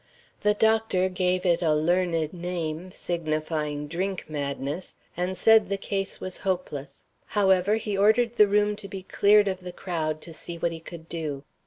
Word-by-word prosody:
The 210 0 +3
doctor 220 -4 +2
gave 185 0 0
it 170 -1 +3
a 155 -3 +3
learned 165 0 +1
name, 175 -1 -4
signifying 155 -4 -2
drink 185 +4 -3
madness, 145 +2 -4 0.2
and 180 +2 -2
said 220 0 +5
the 200 - 0
case 195 0 -3
was 185 -1 -4
hopeless. 175 -6 -4 0.3
However, 190 0 +4
he 215 -2 -2
ordered 220 +4 +4
the 210 -3 +6
room 210 +1 +2
to 205 - -8
be 195 -2 -7
cleared 205 +2 +4
of 190 -1 -1
the 180 -1 -7
crowd 160 -4 -3
to 165 - -9
see 170 +2 -7
what 170 0 0
he 165 - -6
could 165 0 -10
do. 150 -5 -4
180 Hz, 170 wpm, -26 LUFS, 160-195 Hz, 0.3 s, the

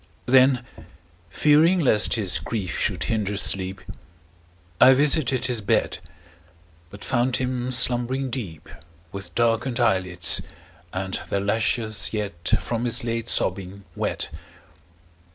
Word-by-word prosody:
Then, 130 -1 +3 0.6
fearing 155 - +3
lest 120 -9 +3
his 95 -9 +2
grief 95 +1 -5
should - - -1
hinder 105 -2 -2
sleep, 95 -1 +1 1.0
I 130 +1 +7
visited 140 -2 +2
his 120 -2 0
bed, 100 - -1 0.9
But 100 +2 -12
found 125 0 0
him 125 -1 -3
slumbering 130 +1 0
deep, 95 - -6 0.4
With 100 0 -9
darken'd 120 +2 0
eyelids, 90 -7 +3 0.5
and 95 0 -4
their 100 - -1
lashes 110 +1 0
yet 100 -6 -5
10 - - +1
From 120 0 -4
his 120 0 0
late 115 0 -3
sobbing 95 +1 -1
wet. - - -4
115 Hz, 115 wpm, -23 LUFS, 100-125 Hz, 1.0 s, I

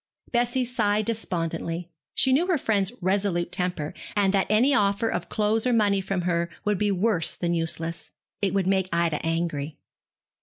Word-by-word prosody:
Bessie 245 +1 +1
sighed 215 -3 +1
despondently. 170 -5 -3 0.2
She 265 - +4
knew 330 +7 +3
her 360 -4 +2
friend's 205 -7 0
resolute 185 -2 0
temper, 180 -4 -1 0.2
and 200 -2 +2
that 195 -1 +2
any 235 +7 +4
offer 205 -2 +2
of 175 -4 -3
clothes 215 +2 +1
or 250 - +2
money 205 -3 +3
from 190 -1 -2
her 170 -1 0 0.2
would 210 -2 +1
be 210 - +2
worse 195 -3 +1
than 175 -1 -1
useless. 165 0 -3 0.3
It 200 -1 0
would 195 -2 +2
make 190 -1 +1
Ida 170 -2 0
angry. 160 -3 -2
195 Hz, 165 wpm, -25 LUFS, 170-215 Hz, 0.3 s, She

